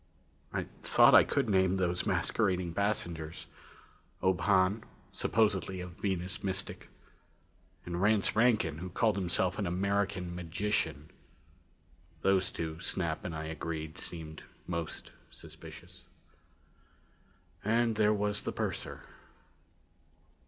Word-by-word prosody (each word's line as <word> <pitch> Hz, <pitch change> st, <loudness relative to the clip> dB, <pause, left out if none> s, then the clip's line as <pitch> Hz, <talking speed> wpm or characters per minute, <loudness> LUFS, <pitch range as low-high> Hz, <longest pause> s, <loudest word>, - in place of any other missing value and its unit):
I -, -, -2 dB, 0.2 s
thought -, -, +6 dB
I -, -, +10 dB
could -, -, 0 dB
name 95 Hz, -2 st, +3 dB
those 90 Hz, -1 st, 0 dB
masquerading 90 Hz, -2 st, +1 dB
passengers. 85 Hz, -5 st, -2 dB, 0.8 s
Ob 95 Hz, -1 st, +3 dB
Hahn, 100 Hz, +2 st, +3 dB, 0.3 s
supposedly 95 Hz, -4 st, +1 dB
a 90 Hz, -, -4 dB
Venus 90 Hz, +1 st, -3 dB
mystic. 95 Hz, -1 st, -2 dB, 1.0 s
And 85 Hz, 0 st, -3 dB
Rance 105 Hz, 0 st, +3 dB
Rankin, 110 Hz, -9 st, +3 dB
who 90 Hz, +2 st, -5 dB
called 105 Hz, +4 st, +2 dB
himself 90 Hz, 0 st, +1 dB
an 100 Hz, -, 0 dB
American 95 Hz, 0 st, 0 dB
magician. 85 Hz, -3 st, -2 dB, 1.1 s
Those 95 Hz, -1 st, +3 dB
two, 80 Hz, -1 st, -4 dB
Snap 85 Hz, -4 st, -1 dB
and 85 Hz, -, -4 dB
I 80 Hz, -, -4 dB
agreed, 80 Hz, 0 st, -5 dB
seemed 80 Hz, -2 st, -6 dB, 0.2 s
most 85 Hz, -2 st, -4 dB, 0.2 s
suspicious. -, -, -12 dB, 1.6 s
And 115 Hz, +1 st, +2 dB
there 105 Hz, 0 st, +4 dB
was 105 Hz, 0 st, 0 dB
the -, -, -3 dB
purser. -, -, -4 dB
95 Hz, 110 wpm, -32 LUFS, 85-100 Hz, 1.6 s, I